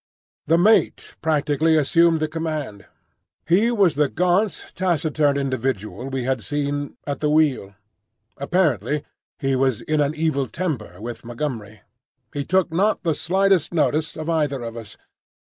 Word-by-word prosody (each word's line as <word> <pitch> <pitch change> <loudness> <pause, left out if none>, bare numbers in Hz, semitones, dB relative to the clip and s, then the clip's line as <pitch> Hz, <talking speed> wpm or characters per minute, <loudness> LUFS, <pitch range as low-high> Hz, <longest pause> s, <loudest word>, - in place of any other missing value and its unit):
The 165 - +4
mate 215 +6 +2
practically 155 0 +2
assumed 165 +2 +3
the 155 - +1
command. 155 -9 -4 0.6
He 190 +8 +3
was 200 -9 +3
the 145 -1 +1
gaunt, 180 +6 0
taciturn 155 -5 +1
individual 130 -3 -2
we 135 -2 -3
had 130 -1 -1
seen 145 +4 -3
at 145 - -3
the 150 - 0
wheel. 145 -10 +1 0.6
Apparently 145 - 0 0.3
he 135 -1 0
was 130 -3 +1
in 155 -1 0
an 145 +1 0
evil 155 -4 0
temper 145 - -4
with 120 +2 -7
Montgomery. 115 -4 -5 0.5
He 145 - -2
took 185 +1 +1
not 200 +7 +1
the 165 -3 +1
slightest 190 0 +1
notice 155 0 0
of 155 0 -5
either 150 -6 0
of 115 0 -6
us. 115 -3 -9
150 Hz, 145 wpm, -22 LUFS, 135-165 Hz, 0.6 s, The